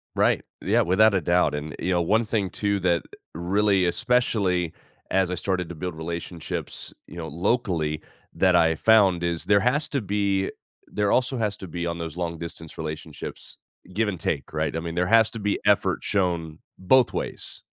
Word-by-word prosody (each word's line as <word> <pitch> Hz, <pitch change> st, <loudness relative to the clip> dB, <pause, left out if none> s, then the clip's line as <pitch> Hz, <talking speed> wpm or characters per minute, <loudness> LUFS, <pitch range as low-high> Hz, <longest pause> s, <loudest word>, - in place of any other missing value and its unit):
Right, -, -, +2 dB, 0.2 s
yeah, -, -, +3 dB
without 100 Hz, +3 st, +4 dB
a 95 Hz, -, +2 dB
doubt, 85 Hz, -3 st, +2 dB
and 75 Hz, +1 st, -5 dB
you 90 Hz, -, -1 dB
know, 85 Hz, -1 st, +2 dB
one 110 Hz, +7 st, +2 dB
thing 105 Hz, -3 st, -1 dB
too 100 Hz, -1 st, 0 dB
that 85 Hz, -2 st, +2 dB, 0.3 s
really 95 Hz, +3 st, +2 dB
especially 90 Hz, -5 st, +1 dB, 0.4 s
as 95 Hz, -1 st, +2 dB
I -, -, -1 dB
started 90 Hz, -1 st, -1 dB
to 85 Hz, -, -7 dB
build 90 Hz, +1 st, -5 dB
relationships, 85 Hz, +1 st, -5 dB
you 85 Hz, -, -11 dB
know, 80 Hz, -1 st, -5 dB
locally, 85 Hz, -, -1 dB, 0.3 s
that 90 Hz, -1 st, +3 dB
I 80 Hz, -1 st, +4 dB
found 95 Hz, -3 st, +4 dB
is 85 Hz, -1 st, -1 dB
there 100 Hz, 0 st, +5 dB
has 140 Hz, +8 st, +1 dB
to 140 Hz, -4 st, -1 dB
be 100 Hz, -1 st, 0 dB, 0.3 s
there 105 Hz, -1 st, -1 dB
also 130 Hz, 0 st, +2 dB
has 105 Hz, -3 st, -1 dB
to 95 Hz, -, -8 dB
be- 85 Hz, +1 st, -4 dB
on 85 Hz, -, -3 dB
those 85 Hz, -1 st, -5 dB
long-distance 85 Hz, -2 st, -5 dB
relationships- 80 Hz, -1 st, -7 dB, 0.4 s
give 110 Hz, +2 st, +1 dB
and 90 Hz, -, -5 dB
take, 70 Hz, -4 st, -2 dB
right? -, -, -1 dB
I 80 Hz, -, 0 dB
mean, 85 Hz, 0 st, -5 dB
there 90 Hz, +1 st, +1 dB
has 115 Hz, 0 st, +5 dB
to 115 Hz, -, -6 dB
be 105 Hz, 0 st, 0 dB
effort 105 Hz, -2 st, +2 dB
shown 85 Hz, -5 st, -1 dB, 0.2 s
both 120 Hz, +7 st, +4 dB
ways, -, -, -4 dB
90 Hz, 180 wpm, -25 LUFS, 85-105 Hz, 0.4 s, there